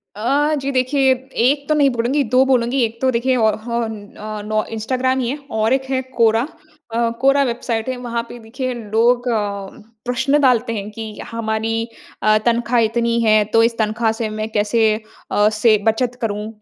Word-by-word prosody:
अ, 280 +8 +1
जी 275 +1 -3
देखिए, 265 +1 +2
1 265 +2 -1
तो 305 - +3
नहीं 285 -2 +4
बोलूँगी 250 +4 0
2 255 +2 +3
बोलूँगी। 255 0 +1
एक 230 0 -3
तो 260 -1 +3
देखिए 255 +2 +1
औ 220 -2 +3 0.2
हौन 220 -3 -4
औ 215 0 -6
नौ 215 0 0
इंस्टाग्राम 255 +4 0
ही 240 -2 -1
है 280 - -2 0.2
और 220 +3 +2
एक 265 0 +1
है 260 -1 0
क्वोरा, 230 -3 +2 0.5
अ, 230 0 +1
क्वोरा 275 +2 +4
वेबसाइट 235 -2 -2
है, 255 - -3
वहाँ 235 -1 -3
पे 240 - -9
देखिए 255 +3 -4
लोग 235 +2 +1
अ, 200 -3 -2 0.4
प्रश्न 260 +4 +1
डालते 245 -4 +2
हैं 205 -1 -4
कि 220 0 -8
हमारी 225 -1 -2 0.5
अ, 215 0 +5
तनख्वाह 235 0 +2
इतनी 235 +1 +1
है, 215 -1 +4
तो 225 +2 +3
इस 230 0 +1
तनख्वाह 220 +1 +1
से 225 0 -3
मैं 215 +1 -4
कैसे 215 +1 +2 0.4
अ, 205 +1 +4
से 215 0 +3
बचत 240 +2 +1
करूँ 210 -2 -2
235 Hz, 185 wpm, -19 LUFS, 220-255 Hz, 0.5 s, अ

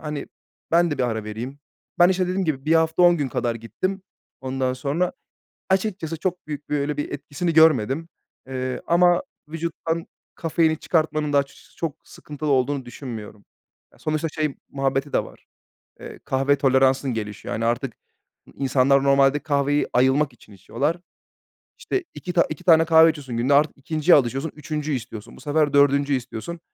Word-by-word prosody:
hani, 150 -2 -5 0.4
ben 170 0 +4
de 145 - -3
bir - - +1
ara 110 -3 -1
vereyim." 115 +6 -6 0.4
Ben, 175 0 +7
işte, 185 0 +1
dediğim 185 +1 -1
gibi 145 -4 -2
1 160 - +3
hafta 160 +2 +3
10 175 -1 +6
gün 145 -4 -1
kadar 120 -1 -1
gittim. 185 - -4 0.4
Ondan 130 0 -1
sonra 140 +8 -1 0.6
açıkçası 190 -4 -1
çok 180 0 -3
büyük 150 -1 -7
bir, 150 - +1
öyle 145 +1 -2
bir 145 - -3
etkisini 145 +4 -3
görmedim. 160 0 +4 0.4
Eee, 130 -1 -4
ama 175 0 +4 0.3
vücuttan 165 0 -3 0.3
kafeini 160 -1 +1
çıkartmanın 155 -2 0
da - - +5
açıkçası 140 0 -4
çok 165 -4 -3
sıkıntılı 150 0 -7
olduğunu 135 0 +1
düşünmüyorum. 110 -5 -9 0.5
Ya, - - -23
sonuçta 155 +1 -1
şey 155 -2 -2
muhabbeti 135 +1 -1
de - - +2
var. - - -16 0.5
Eee, - - -10
kahve 135 +2 +2
toleransın 135 -1 +2
gelişiyor. 105 -2 -5
Hani, 115 - -2
artık 120 +1 -1 0.5
n - - -17
insanlar 135 0 +3
normalde 140 +1 +4
kahveyi 145 0 +1
ayılmak 130 +3 +3
için 110 -3 -18
içiyorlar. 145 - -2 0.8
İşte, 385 - -2
2 180 - -6
ta 175 - +4
2 155 - -7
tane 165 -2 +6
kahve 160 0 +7
içiyorsun 140 -6 -4
günde, 125 +4 +2
artık 150 +1 +3
2.’nciye 155 +4 +3
alışıyorsun, 135 +4 -1
3.’üncüyü 150 -1 -3
istiyorsun. 110 -3 -9
Bu - - -15
sefer 150 0 +1
4.’üncüyü 140 0 +4
istiyorsun. 130 +7 -7
145 Hz, 165 wpm, -23 LUFS, 130-160 Hz, 0.8 s, Ben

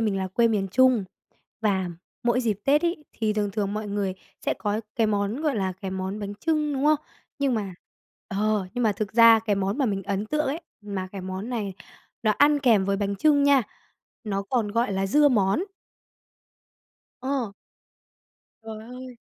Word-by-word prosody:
mình 210 -3 +1
là 190 -1 -2
quê 230 +5 +3
miền 205 -3 0
Trung, 255 0 +4 0.6
và 190 -4 +1 0.3
mỗi 240 +1 +2
dịp 220 -5 0
Tết 290 +3 +4
ấy, 340 -3 -1
thì 220 -2 0
thường 210 -1 -1
thường 205 -1 -2
mọi 215 0 -3
người 200 -2 -1 0.3
sẽ - - +2
có 210 +1 -2 0.2
cái 225 -2 +3
món, 205 +5 -1
gọi 300 -6 +1
là, 190 -2 0
cái 195 -2 -4
món 190 +2 -3
bánh 205 0 -5
chưng, 305 +4 0
đúng 275 +1 -1
không? 305 0 +5 0.4
Nhưng 275 -3 +1
mà 200 -4 -3 0.5
ờ, 210 0 0
nhưng 245 - 0
mà 215 - +3
thực 205 +1 -4
ra 230 0 +8
cái 215 -2 0
món 195 +6 -1
mà 270 - +2
mình 195 -3 -1
ấn 200 +1 -2
tượng 305 +5 0
ấy, 300 +5 -2 0.2
mà 200 -2 -4
cái 195 - -5
món 190 +4 -5
này 215 -6 -3 0.5
nó 215 - +3
ăn 290 0 +5
kèm 230 -8 +4
với 200 0 +1
bánh 200 0 -1
chưng 290 +5 +4
nha, 280 -2 +5 0.6
nó 200 -2 -1
còn 220 +1 0
gọi 230 -1 +1
là 195 0 0
dưa 290 +9 +5
món. 210 - +2 1.6
Ờ. 260 -5 -2 1.1
Trời 220 -1 -7 0.2
ơi! 255 -1 -9
215 Hz, 190 wpm, -25 LUFS, 200-255 Hz, 1.6 s, ra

